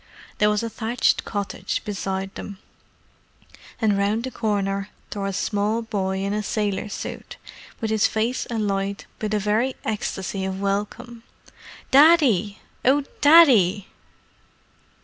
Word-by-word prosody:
There 210 Hz, -, +4 dB
was 210 Hz, +1 st, 0 dB
a 230 Hz, -, -2 dB
thatched 230 Hz, +2 st, 0 dB
cottage 205 Hz, -2 st, -3 dB
beside 195 Hz, -2 st, -3 dB
them. 200 Hz, -, -8 dB, 1.2 s
And 210 Hz, -3 st, +2 dB
round 210 Hz, +3 st, 0 dB
the 260 Hz, -, -4 dB
corner 200 Hz, -3 st, -1 dB, 0.2 s
tore 200 Hz, -1 st, -3 dB
a -, -, -2 dB
small 205 Hz, +3 st, -1 dB
boy 190 Hz, -4 st, -2 dB
in 200 Hz, +1 st, -1 dB
a 210 Hz, -, -1 dB
sailor 210 Hz, -1 st, -2 dB
suit, -, -, -7 dB, 0.4 s
with 220 Hz, -2 st, -2 dB
his 220 Hz, -1 st, +3 dB
face 230 Hz, +4 st, -1 dB
alight 200 Hz, -3 st, -2 dB, 0.2 s
with 215 Hz, -2 st, -2 dB
a 215 Hz, -, +2 dB
very 215 Hz, +6 st, 0 dB
ecstasy 195 Hz, -2 st, -3 dB
of 190 Hz, 0 st, -3 dB
welcome. 210 Hz, +4 st, -3 dB, 0.7 s
"Daddy! 265 Hz, -, +5 dB, 0.3 s
Oh, 280 Hz, +3 st, +3 dB, 0.2 s
Daddy!" 235 Hz, -, +6 dB
210 Hz, 130 wpm, -23 LUFS, 195-230 Hz, 1.2 s, Daddy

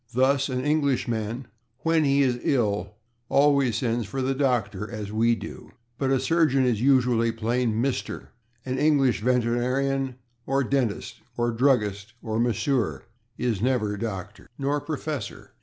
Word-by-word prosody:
Thus 135 Hz, +2 st, +3 dB
an 130 Hz, +1 st, -2 dB
Englishman, 125 Hz, -5 st, 0 dB, 0.4 s
when 165 Hz, -1 st, +2 dB
he 140 Hz, 0 st, +4 dB
is 125 Hz, -2 st, +1 dB
ill, 105 Hz, -6 st, 0 dB, 0.3 s
always 140 Hz, -4 st, +3 dB
sends 115 Hz, -3 st, -1 dB
for 130 Hz, +5 st, -3 dB
the 135 Hz, +1 st, +1 dB
/doctor/, 115 Hz, -7 st, 0 dB
as 105 Hz, -3 st, -6 dB
we 115 Hz, +2 st, +3 dB
do. -, -, -9 dB, 0.3 s
But 135 Hz, -, 0 dB
a 135 Hz, -1 st, +3 dB
surgeon 135 Hz, -2 st, +2 dB
is 115 Hz, -4 st, +1 dB
usually 125 Hz, -3 st, +3 dB
plain 115 Hz, 0 st, 0 dB
/Mr./ 125 Hz, +3 st, -2 dB, 0.4 s
An 130 Hz, 0 st, -2 dB
English 140 Hz, -8 st, +3 dB
veterinarian 125 Hz, +2 st, 0 dB, 0.3 s
or 135 Hz, +1 st, +2 dB
dentist 125 Hz, -5 st, -2 dB, 0.2 s
or 120 Hz, 0 st, +1 dB
druggist 110 Hz, -4 st, +1 dB
or 110 Hz, 0 st, -2 dB
masseur 120 Hz, +1 st, 0 dB, 0.3 s
is 115 Hz, -6 st, -1 dB
never 115 Hz, -4 st, +1 dB
/Dr./ 100 Hz, -2 st, -6 dB
Nor 145 Hz, +1 st, 0 dB
/Professor 145 Hz, -6 st, -5 dB
125 Hz, 140 wpm, -25 LUFS, 115-135 Hz, 0.4 s, he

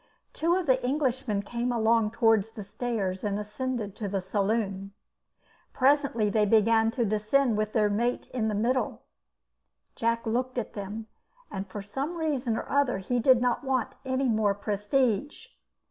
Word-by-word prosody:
Two 335 Hz, +2 st, +1 dB
of 370 Hz, -1 st, -1 dB
the 260 Hz, -2 st, +2 dB
Englishmen 255 Hz, -6 st, 0 dB
came 240 Hz, +3 st, -2 dB
along 225 Hz, -1 st, +2 dB
towards 225 Hz, -2 st, +2 dB
the 210 Hz, -, -7 dB
stairs 200 Hz, -3 st, -3 dB
and 205 Hz, -1 st, -1 dB
ascended 210 Hz, 0 st, -4 dB
to 210 Hz, -, -3 dB
the 195 Hz, 0 st, -1 dB
saloon. 195 Hz, 0 st, -1 dB, 0.8 s
Presently 270 Hz, -5 st, +2 dB
they 210 Hz, +1 st, +2 dB
began 225 Hz, +1 st, +4 dB
to 235 Hz, -1 st, 0 dB
descend 215 Hz, +4 st, +2 dB
with 215 Hz, 0 st, -1 dB
their 215 Hz, -3 st, +3 dB
mate 235 Hz, +4 st, 0 dB
in 230 Hz, -4 st, 0 dB
the 215 Hz, -, -1 dB
middle. 245 Hz, +5 st, 0 dB, 0.9 s
Jack 230 Hz, 0 st, 0 dB
looked 250 Hz, +3 st, -1 dB
at 240 Hz, -, -3 dB
them, 205 Hz, +2 st, -6 dB, 0.5 s
and 195 Hz, +1 st, -4 dB
for 200 Hz, +1 st, -7 dB
some 275 Hz, +11 st, -4 dB
reason 275 Hz, -8 st, -1 dB
or -, -, -5 dB
other 280 Hz, -5 st, +2 dB
he 240 Hz, +6 st, -1 dB
did 255 Hz, +1 st, +5 dB
not 245 Hz, +1 st, +1 dB
want 265 Hz, -3 st, -1 dB
any 260 Hz, 0 st, 0 dB
more 215 Hz, -3 st, +2 dB
prestige. 225 Hz, -, -1 dB
225 Hz, 160 wpm, -28 LUFS, 210-255 Hz, 0.9 s, did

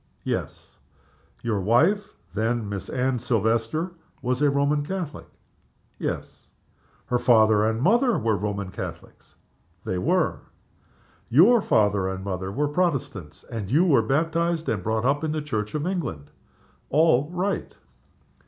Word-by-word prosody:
"Yes." -, -, -5 dB, 0.6 s
"Your 110 Hz, -4 st, 0 dB
wife 160 Hz, -, +3 dB, 0.2 s
then 110 Hz, +1 st, -1 dB
Miss 100 Hz, -1 st, -5 dB
Anne 130 Hz, 0 st, 0 dB
Silvester 115 Hz, -, 0 dB, 0.3 s
was 125 Hz, +2 st, -1 dB
a 145 Hz, -, +4 dB
Roman 140 Hz, +1 st, +1 dB
Catholic?" 175 Hz, -2 st, -5 dB, 0.7 s
"Yes." -, -, -5 dB, 0.6 s
"Her 125 Hz, -, 0 dB
father 110 Hz, -3 st, +5 dB
and 110 Hz, 0 st, -1 dB
mother 240 Hz, -, +3 dB
were 115 Hz, -5 st, +1 dB
Roman 100 Hz, -1 st, -3 dB
Catholics?" -, -, -9 dB, 0.5 s
"They 90 Hz, -, -2 dB
were." 175 Hz, -, +1 dB, 0.9 s
"Your 205 Hz, -, +6 dB
father 100 Hz, -, +2 dB
and 95 Hz, 0 st, -4 dB
mother 95 Hz, -1 st, -4 dB
were 145 Hz, +8 st, 0 dB
Protestants? 135 Hz, -, -2 dB
and 110 Hz, -5 st, -6 dB
you 155 Hz, +9 st, +4 dB
were 140 Hz, -10 st, +5 dB
baptized 165 Hz, +6 st, 0 dB
and 105 Hz, -4 st, -1 dB
brought 110 Hz, +4 st, -1 dB
up 145 Hz, +3 st, +1 dB
in 155 Hz, -1 st, -1 dB
the 155 Hz, -, -1 dB
Church 110 Hz, -6 st, -3 dB
of 150 Hz, +1 st, -1 dB
England?" 160 Hz, -, -4 dB, 0.6 s
"All 150 Hz, -2 st, +3 dB
right!" 180 Hz, +3 st, -3 dB
125 Hz, 135 wpm, -25 LUFS, 105-160 Hz, 0.9 s, Your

